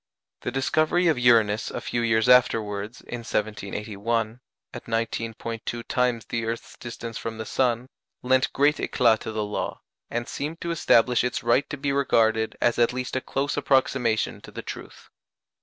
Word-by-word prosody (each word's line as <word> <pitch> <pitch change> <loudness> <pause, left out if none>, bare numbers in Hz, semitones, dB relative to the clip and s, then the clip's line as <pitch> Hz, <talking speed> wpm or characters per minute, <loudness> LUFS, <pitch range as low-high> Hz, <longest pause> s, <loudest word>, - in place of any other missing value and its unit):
The - - -2
discovery 155 +6 +2
of 155 - +1
Uranus 115 -3 +4
a - - -4
few 120 - -2
years 110 0 +2
afterwards, 110 -3 +3
in 120 - -6
1781, 110 +1 -2 0.3
at 120 - -8
19·2 115 0 -3
times 125 -3 0
the 115 -1 -3
earth's 115 +1 -5
distance 115 -1 -7
from 115 -1 -5
the 110 - -5
sun, 125 +1 0 0.4
lent 130 +1 +3
great 145 +2 +3
éclât 115 -4 +2
to 110 - -6
the 110 -1 -2
law, 105 - -4 0.3
and 120 0 -3
seemed 155 +4 -4
to 170 - -2
establish 125 -7 +3
its 125 -3 -2
right 120 +4 +2
to 145 - -4
be 140 0 -1
regarded 110 -5 +2
as 120 -1 +2
at 120 0 +3
least 125 0 -4
a 130 - 0
close 140 +3 -2
approximation 130 -4 +1
to - - -12
the - - -8
truth. - - -9
120 Hz, 165 wpm, -25 LUFS, 110-130 Hz, 0.4 s, Uranus